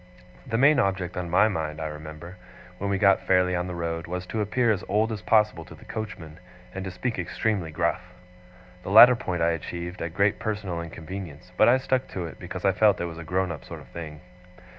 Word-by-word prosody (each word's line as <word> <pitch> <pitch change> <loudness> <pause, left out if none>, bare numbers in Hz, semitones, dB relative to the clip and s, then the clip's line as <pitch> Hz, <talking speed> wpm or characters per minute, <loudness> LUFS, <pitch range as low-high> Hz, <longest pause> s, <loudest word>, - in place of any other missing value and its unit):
The 115 -2 -1
main 140 +3 +5
object 95 -5 -1
on 90 -2 -4
my 95 +5 +5
mind, 80 -6 -3
I 80 - -3
remember, 75 +3 -8 0.4
when 100 - -2
we 100 - +1
got 100 0 +3
fairly 90 -1 +3
on 90 +1 -2
the 90 - -5
road, 85 -1 -3
was 90 +1 -4
to 110 +4 -3
appear 115 +3 +2
as 100 - -1
old 110 +2 +1
as 105 -2 -4
possible 105 -6 +2
to - - -12
the 110 - -16
coachman, 90 -9 -7 0.3
and 95 - -5
to - - -3
speak 110 +4 -3
extremely 95 0 -1
gruff. 80 - -1 0.8
The 95 - -7
latter 120 +5 +9
point 90 -8 -2
I 85 - +3
achieved 85 +2 -5
at 85 0 -5
great 100 +1 +2
personal 100 -6 -3
inconvenience; 85 0 -8
but 110 - +5
I 125 - +6
stuck 130 0 -1
to 90 -2 -3
it, 80 - -9
because - - -6
I 95 - +5
felt 105 +1 +3
it 85 - -1
was 85 -1 -7
a - - -7
grown 90 +2 -1
up 75 -6 -7
sort - - -9
of - - -15
thing. 75 -3 -8
90 Hz, 225 wpm, -26 LUFS, 85-105 Hz, 0.8 s, latter